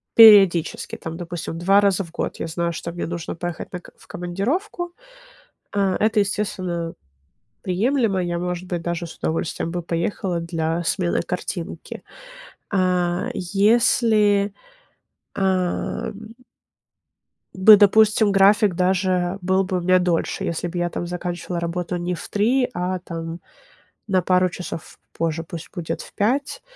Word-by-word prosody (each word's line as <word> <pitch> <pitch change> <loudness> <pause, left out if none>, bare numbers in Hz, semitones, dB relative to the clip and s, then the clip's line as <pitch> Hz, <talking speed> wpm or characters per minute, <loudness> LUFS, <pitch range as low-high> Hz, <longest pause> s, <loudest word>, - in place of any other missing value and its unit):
периодически, 200 -7 +6
там, 165 0 -7
допустим, 170 -1 -5
2 195 +4 +4
раза 200 -1 +2
в 170 - -13
год 170 - -4
я - - -4
знаю, 170 +1 -2
что 170 - -5
мне 175 - -4
нужно 170 -1 -5
поехать 175 0 -5
на 180 - -4
к - - -15
в - - -20
командировку, 315 - -3 0.8
а, 195 -2 +1
это, 215 0 +2
естественно, 185 -4 -2 0.7
приемлемо. 205 +1 +1
Я, 175 -1 -2
может 180 +1 -4
быть, 175 -2 -3
даже 170 0 -3
с 165 - -11
удовольствием 165 +1 -2
бы 175 -1 -3
поехала 170 +1 -2
для 165 0 -2
смены 175 0 0
картинки. 175 -2 -5 0.7
А, 180 -2 +1
если, 205 +1 +3 0.8
а, 185 -2 -1
м 215 +2 -10 1.2
Да, 200 +3 +8
допустим, 210 +1 +5
график 200 0 +5
даже 185 0 +1
был 190 +1 +2
бы 185 0 -2
у - - 0
меня 185 +1 +3
дольше, 175 -2 -1
если 170 +1 -2
б 175 +1 -6
я 175 0 0
там 175 - -4
заканчивала 175 0 -4
работу 170 +1 -3
не 175 +1 -2
в - - -9
3, 245 +5 +2
а 180 +1 -2
там 165 -1 -6 0.7
на 190 -3 +2
пару 185 +1 +2
часов 175 -2 -8 0.2
позже, 165 0 -2
пусть 165 0 -8
будет 165 -3 -4
в - - -14
5, 260 +7 -1
180 Hz, 145 wpm, -22 LUFS, 170-200 Hz, 1.2 s, Да